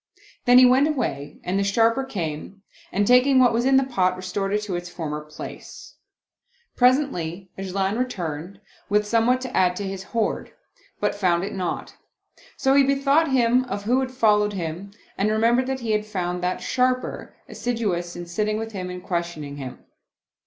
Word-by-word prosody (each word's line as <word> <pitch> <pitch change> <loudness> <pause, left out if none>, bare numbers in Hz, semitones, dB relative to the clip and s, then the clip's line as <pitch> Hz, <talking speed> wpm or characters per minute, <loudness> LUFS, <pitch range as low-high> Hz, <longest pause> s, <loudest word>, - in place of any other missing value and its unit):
Then 245 0 +7
he 255 - +9
went 260 +4 +5
away 150 - -3
and 190 +2 -1
the - - +2
Sharper 230 +6 +2
came 190 - -5 0.3
and 205 +2 +1
taking 250 +4 +5
what 250 -2 +5
was 235 +2 +1
in 265 0 +5
the 270 - +4
pot, 185 -9 +1
restored 185 +2 -3
it 210 +1 0
to 200 -4 -3
its 175 0 -5
former 155 -4 -4
place. 150 0 -10 0.8
Pres 250 +1 +6
ently 185 - -4
'Ajlan 195 +3 -2
returned, 180 -6 -4 0.3
with 210 +1 +2
somewhat 230 +4 +2
to 255 -1 -6
add 180 -1 +3
to 205 - -4
his 190 0 -5
hoard, 220 +3 -2 0.5
but - - 0
found 180 -3 +1
it 200 - -4
not; 185 -2 -4 0.6
so 270 - +2
he 280 - +6
bethought 275 +3 +3
him 250 -1 +3
of 200 -5 -4
who 245 +5 +2
had 260 -1 -1
followed 210 -5 +2
him 175 +1 -5 0.3
and 200 +2 +2
remembered 230 +4 +2
that 265 -1 -3
he 230 -2 -2
had 210 0 +1
found 180 -3 -3
that 180 +1 -1
Sharper 255 0 -1
assidu 230 -6 -1
ous 175 0 -6
in 175 - -6
sitting 210 +5 -1
with 225 0 -5
him 185 -3 -5
and 180 0 -7
questioning 170 -5 -4
him. 130 -3 -8
210 Hz, 180 wpm, -24 LUFS, 180-250 Hz, 0.8 s, he